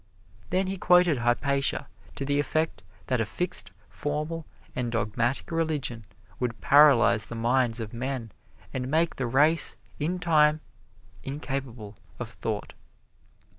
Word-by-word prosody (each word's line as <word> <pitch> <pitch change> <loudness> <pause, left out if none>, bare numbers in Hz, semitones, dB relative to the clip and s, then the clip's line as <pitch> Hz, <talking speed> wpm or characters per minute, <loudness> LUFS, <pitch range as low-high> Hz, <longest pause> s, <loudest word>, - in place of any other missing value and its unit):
Then 190 +1 +1
he 190 0 -4
quoted 180 -7 +4
Hypatia 140 +4 +1 0.3
to 135 - -4
the 145 +1 +1
effect 155 +2 -1 0.2
that 125 -3 0
a - - 0
fixed, 180 +9 0 0.2
formal 150 +2 -4 0.3
and 125 -2 -2
dogmatic 115 +4 -1
religion 150 -9 -1 0.3
would 120 -2 -2
paralyze 120 -7 +5
the 120 - -7
minds 120 0 +1
of 110 -1 -6
men 125 -2 -4 0.4
and 130 0 -3
make 160 +3 +1
the 125 - -1
race, 150 +7 +4 0.2
in 165 +5 -1
time, 155 -3 +3 0.6
incapable 135 -7 -5 0.2
of - - -6
thought. - - -4
135 Hz, 130 wpm, -27 LUFS, 120-155 Hz, 0.6 s, paralyze